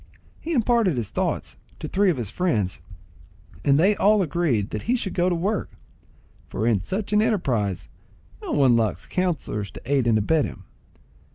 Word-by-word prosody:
He 335 - -4
imparted 230 - +2
his 110 -4 -3
thoughts - - -2 0.2
to - - -6
three 200 0 +2
of 165 - +1
his 110 -5 -4
friends, 110 - -1 0.8
and 140 0 +4
they 195 +5 +4
all 205 0 +4
agreed 145 - 0
that 110 - -3
he 250 - +4
should 205 -6 -2
go 180 0 +2
to 175 - 0
work, 195 +5 -1 0.8
for 110 - -3
in 115 -4 +3
such 195 - -3
an 210 - +5
enterprise 125 - 0 0.5
no - - -5
one 130 -4 +4
lacks 110 -5 0
counsellors 160 - -2
to - - -11
aid 135 -2 +1
and 115 -2 +4
abet 145 +8 +2
him. - - -8
160 Hz, 175 wpm, -24 LUFS, -, 0.8 s, an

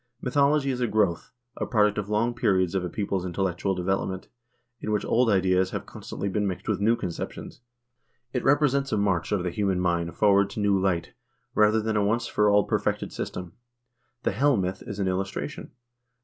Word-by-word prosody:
Mythology 140 +2 +2
is 125 -1 -3
a 120 - +2
growth, 105 -5 0 0.3
a - - -2
product 105 -3 +2
of 105 0 -5
long 110 +3 +1
periods 95 -7 +1
of 95 -2 0
a 90 - -3
people's 100 -1 -2
in 90 -1 -5
tellectual 95 +1 -1
development, 95 +1 -2 0.5
in 110 - -4
which 105 -2 0
old 120 0 +3
ideas 95 -2 +3
have - - -5
constantly 100 - -6
been 100 +1 0
mixed 95 - -5
with 110 -3 0
new 110 +3 +3
conceptions. 90 +1 -6 0.7
It 125 - -1
represents 140 -1 +2
a 110 - +1
march 95 -4 0
of 100 -4 +1
the 90 - -2
human 95 -1 0
mind 85 -2 0
forward 100 -1 +4
to 100 - -6
new 100 -2 +2
light, 95 -3 -1 0.4
rather 105 +1 +4
than 110 0 -1
a 105 - +2
once 115 +4 +1
for 105 -2 +2
all 105 0 +5
perfected - - -1
system. 90 -2 -5 0.7
The - - +1
Hel 135 +5 +2
myth 95 0 -2
is 105 - -5
an 100 -2 -1
illustration. 95 +1 -3
100 Hz, 190 wpm, -26 LUFS, 95-110 Hz, 0.7 s, all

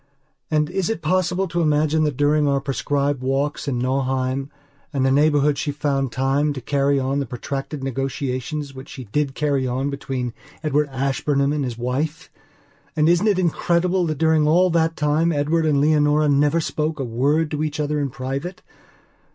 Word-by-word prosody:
And 150 -1 +2
is 190 0 -1
it 200 -7 -3
possible 185 +3 +1
to 170 0 -1
imagine 155 0 +2
that 145 -4 -2
during 145 +1 +3
our 140 -1 +2
prescribed 140 0 -1
walks 135 +3 -1
in 130 -3 -1
Nauheim 130 +1 -1 0.4
and 135 -3 0
the 135 - +3
neighbourhood 145 0 +3
she 145 - -1
found 140 -3 -1
time 135 +4 +1
to 135 - -5
carry 140 +2 +1
on 135 +2 -1
the 140 - -2
protracted 135 +4 -5
negotiations 135 +2 -3
which 130 0 -10
she 130 - -8
did 135 +5 -2
carry 140 -3 0
on 130 +3 -1
between 135 -3 -4 0.3
Edward 150 -1 +1
Ashburnham 140 +1 0
and 150 -2 -1
his 120 -3 -4
wife? 150 +8 -3 0.6
And 155 -1 +3
isn't 175 +5 +3
it 205 -3 +3
incredible 175 +1 +1
that 155 -2 -2
during 160 0 +3
all 180 +3 +4
that 165 0 +1
time 155 +3 +2
Edward 155 +2 +1
and 145 -2 +3
Leonora 150 0 +3
never 145 +3 +3
spoke 155 0 -2
a - - -1
word 145 +7 +1
to 150 0 -1
each 155 -1 -3
other 150 0 0
in 140 -1 -1
private? 135 +8 -5
145 Hz, 175 wpm, -22 LUFS, 135-155 Hz, 0.6 s, all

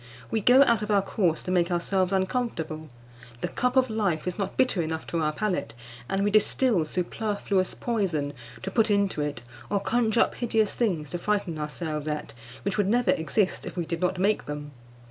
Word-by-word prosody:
We 220 - +1
go 255 +6 +7
out 235 -5 +3
of 210 - -4
our 200 -2 +3
course 175 -6 0
to 185 - -3
make 175 -1 +2
ourselves 185 +2 +1
uncomfortable; 185 -6 -2 0.5
the - - 0
cup 250 +1 -1
of 260 -1 +5
life 200 -8 -1
is 180 +3 -3
not 195 - -3
bitter 250 -8 +3
enough 160 0 -3
to 170 - -2
our 155 -1 +1
palate, 180 - -2 0.3
and 195 +1 0
we 205 - +2
distil 215 -3 +3
superfluous 190 +2 -1
poison 175 -12 -1 0.3
to 190 - -3
put 225 +2 +3
into 200 -6 +1
it, 145 -5 -3 0.3
or 200 - +1
conjure 225 +2 +2
up - - +2
hideous 220 -3 +1
things 170 - -1
to 175 - -3
frighten 200 -5 -1
ourselves 150 0 -4
at, 150 0 -3 0.3
which 200 +1 -1
would 200 - +3
never 245 +4 +3
exist 185 +5 0
if - - -7
we 170 - -1
did 165 0 -4
not 180 0 +1
make 205 +3 +1
them. 150 0 -5
190 Hz, 195 wpm, -27 LUFS, 160-215 Hz, 0.5 s, go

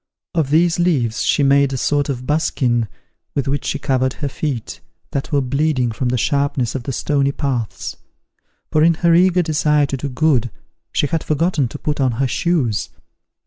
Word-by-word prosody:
Of 160 -6 0
these 165 +3 +3
leaves 135 -10 +1
she 145 - +2
made 140 0 +4
a - - -1
sort 145 +2 0
of 125 -2 -3
buskin, 125 -6 +1 0.5
with 140 -2 -1
which 140 +1 -1
she - - -1
covered 130 -2 0
her 145 - -4
feet, 115 - -4 0.3
that 140 - -3
were 145 -2 +2
bleeding 135 -2 0
from 120 +3 -2
the 125 - 0
sharpness 140 -2 0
of 135 - -3
the 130 - -4
stony 140 +1 0
paths; 130 -7 -3 0.7
for 155 - +3
in 165 0 +5
her 170 +1 +3
eager 180 +1 +4
desire 150 -2 +2
to 140 -1 -3
do 140 +2 -4
good, 130 -3 +1 0.4
she - - +1
had 160 +2 -1
forgotten 155 -2 +1
to - - -8
put 150 -2 -2
on 130 -2 +2
her 130 +4 0
shoes. 125 - 0
140 Hz, 185 wpm, -19 LUFS, 125-155 Hz, 0.7 s, in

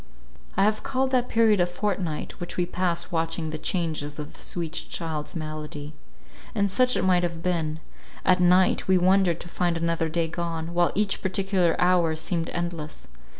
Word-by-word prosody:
I 195 - +4
have 215 +1 +2
called 260 0 0
that 250 -1 +1
period 225 -3 +4
a 175 - +3
fortnight, 180 -3 -3
which 175 - -6
we 180 - +2
passed 180 0 -1
watching 165 -1 -1
the 155 - -4
changes 155 -5 -2
of 150 -1 -7
the - - -15
sweet 170 -2 -3 0.2
child's 160 0 -4
malady—and 155 +6 -5
such 250 +4 +3
it - - 0
might 180 -1 +4
have 170 -2 -3
been—at 165 +1 -1
night, 180 +1 +4
we 190 -1 +5
wondered 185 -1 +3
to - - -8
find 175 -1 0
another 165 -1 0
day 165 +1 0
gone, 165 0 -4
while 175 0 +3
each 205 0 +1
particular 190 -2 +1
hour 175 -3 +3
seemed 165 +1 -2
endless. 170 - -5
175 Hz, 165 wpm, -26 LUFS, 160-185 Hz, 0.2 s, we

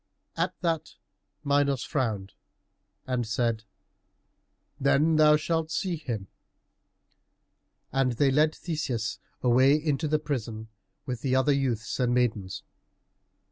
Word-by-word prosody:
At - - -2
that 165 -3 -1 0.5
Minos 140 -2 +2
frowned 110 - -2 0.7
and 125 -3 -1
said, 115 -1 -1 1.1
"Then 150 +3 +3
thou 150 -1 +7
shalt 160 +1 -1
see 180 +2 -1
him." 120 -10 -4 1.7
And 135 -2 +1
they 135 +3 +3
led 155 +3 +3
Theseus 135 -9 -3 0.2
away 130 +3 +5
into 155 0 0
the 155 +1 +2
prison, 115 -7 -4 0.4
with 125 -3 -4
the 130 -2 +1
other 130 +2 +3
youths 130 -6 -1
and 125 -1 +2
maidens. 110 -7 -1
135 Hz, 110 wpm, -27 LUFS, 120-150 Hz, 1.7 s, thou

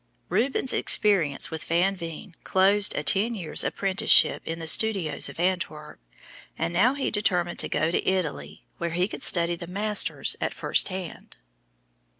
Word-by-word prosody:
Rubens' 260 +1 0
experience 170 -11 +2
with 160 -1 -5
Van 180 +4 +1
Veen 170 +1 -9
closed 200 +2 +2
a 150 - -2
ten 205 +10 +1
years' 170 -7 0
apprenticeship 195 +3 +3
in 165 - -4
the 165 - -7
studios 190 -1 +1
of - - -12
Antwerp, 170 - -3 0.6
and 165 +1 -3
now 235 +10 +2
he 280 - -2
determined 180 -5 -1
to - - +2
go 155 +2 0
to - - 0
Italy, 180 -7 -4
where 170 - -2
he 180 +3 -1
could - - -8
study 170 -1 +1
the 170 0 -10
masters 205 +3 0
at - - -3
first - - +1
hand. 185 -3 -8
180 Hz, 155 wpm, -25 LUFS, 165-205 Hz, 0.6 s, apprenticeship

